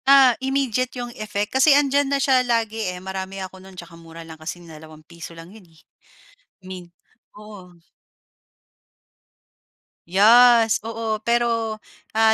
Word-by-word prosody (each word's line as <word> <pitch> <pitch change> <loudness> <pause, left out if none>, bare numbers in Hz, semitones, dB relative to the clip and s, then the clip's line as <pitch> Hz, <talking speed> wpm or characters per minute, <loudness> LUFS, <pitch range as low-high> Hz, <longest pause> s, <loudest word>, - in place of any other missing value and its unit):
Ah, 270 -2 +7
immediate 265 -2 -1
'yung 240 -1 -6
effect 210 -1 -4
kasi 275 +2 +5
'andiyan 285 -1 +1
na 280 - +1
siya 270 -2 +2
lagi 230 -2 -1
eh, 180 - -6
marami 190 +1 -7
ako 190 0 -8
no'n 190 0 -15
tsaka 175 -1 -11
mura 165 0 -12
lang 160 -1 -12
kasi 160 +2 -6
₱2 160 +1 -13
lang 165 +3 -13
'yon 220 - -15
eh, 160 -1 -24 0.8
mint, 180 -2 -11 0.4
oo. 205 -4 -13 2.4
Yes, 225 +4 +5
oo. 225 -1 -4
Pero, 230 -1 -1 0.4
ah, 220 0 +4
215 Hz, 130 wpm, -21 LUFS, 180-240 Hz, 2.4 s, Ah